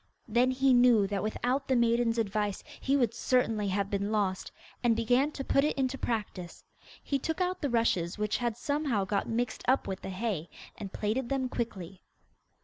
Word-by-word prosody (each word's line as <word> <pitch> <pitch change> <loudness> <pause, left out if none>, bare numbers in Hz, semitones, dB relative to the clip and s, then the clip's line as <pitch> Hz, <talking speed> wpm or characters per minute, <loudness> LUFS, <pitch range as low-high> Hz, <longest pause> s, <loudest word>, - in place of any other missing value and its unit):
Then 240 +3 +3
he 260 +1 +3
knew 245 -4 +5
that 195 -1 -2
without 250 +5 -1
the 260 - +2
maiden's 235 -1 +2
advice 210 -2 -1 0.2
he 275 +1 +1
would 240 -4 +1
certainly 230 -3 +1
have 200 +1 -1
been 200 +1 -1
lost, 200 -3 -1 0.3
and 235 -2 +4
began 245 +6 +2
to 270 - -4
put 275 - +2
it 300 - 0
into 265 0 0
practice. 210 -8 -4 0.4
He 275 - -1
took 320 +6 -3
out 365 0 -1
the 285 - 0
rushes 220 -7 +1
which 210 0 0
had 240 -2 -2
somehow 285 -7 0
got 200 +1 -1
mixed 235 0 -2
up 260 +2 +2
with 190 0 -4
the - - -6
hay, 190 -4 -3 0.3
and 200 -2 -7
plaited 235 +4 -2
them 265 -2 0
quickly. 195 -7 -5
230 Hz, 185 wpm, -30 LUFS, 205-260 Hz, 0.4 s, knew